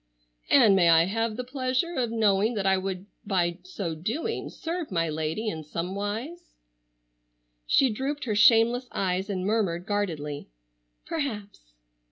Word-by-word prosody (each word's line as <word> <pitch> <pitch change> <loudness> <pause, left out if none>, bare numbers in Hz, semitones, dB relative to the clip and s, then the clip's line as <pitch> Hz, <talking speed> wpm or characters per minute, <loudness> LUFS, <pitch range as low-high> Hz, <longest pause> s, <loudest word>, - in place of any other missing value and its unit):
"And 225 -8 +6
may 175 -3 +5
I 165 0 +6
have 225 +3 -1
the 250 - -3
pleasure 255 +5 -1
of 250 -7 -1
knowing 220 0 +2
that 200 -2 -2
I 190 0 +4
would 190 0 -4 0.2
by 180 -3 0
so 180 -2 -5
doing 230 - -3
serve 335 - -5
my 165 -2 0
lady 160 +8 -2
in 160 -7 -3
some 165 +5 -4
wise?" 225 - -5 1.1
She 265 -3 +4
drooped 275 +6 -3
her 225 - -1
shameless 230 +3 +5
eyes 190 +1 -1
and 185 -2 -2
murmured 195 -5 0
guardedly, 160 - -3 0.6
"Perhaps." 210 - -5
205 Hz, 145 wpm, -27 LUFS, 180-245 Hz, 1.1 s, And